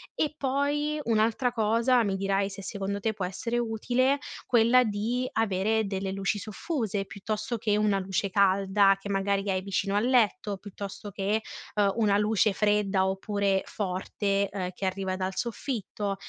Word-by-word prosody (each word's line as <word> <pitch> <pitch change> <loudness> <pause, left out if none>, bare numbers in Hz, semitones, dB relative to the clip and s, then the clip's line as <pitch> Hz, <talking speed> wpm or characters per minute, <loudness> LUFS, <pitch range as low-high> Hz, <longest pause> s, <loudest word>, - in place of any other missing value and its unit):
E 305 - 0
poi 290 +2 0
un'altra 230 +2 +2
cosa, 230 +2 +3
mi 195 -1 0
dirai 195 0 0
se 195 0 -9
secondo 200 +1 -3
te 220 - +1
può 195 -3 -3
essere 230 +6 -3
utile, 245 +4 +1 0.3
quella 245 +1 +5
di 225 +4 -1
avere 220 +1 +1
delle 195 -1 -3
luci 195 +1 -1
soffuse 215 - -3
piuttosto 215 +5 -4
che 210 -1 +1
una 210 -2 +2
luce 190 0 -1
calda 195 0 +4
che 195 +1 -8
magari 200 0 0
hai 185 0 0
vicino 195 +1 -1
al 210 - +2
letto, 225 -5 +2
piuttosto 200 +1 -8
che, 200 +3 0 0.3
uhm, 200 -2 +3
una 210 -3 +3
luce 210 0 +2
fredda 205 -2 +2
oppure 195 0 0
forte, 200 +1 -1
ehm, 185 -2 -3
che 195 - -5
arriva 190 0 -2
dal 190 0 -3
soffitto, 215 -4 -3
205 Hz, 155 wpm, -28 LUFS, 195-225 Hz, 0.3 s, quella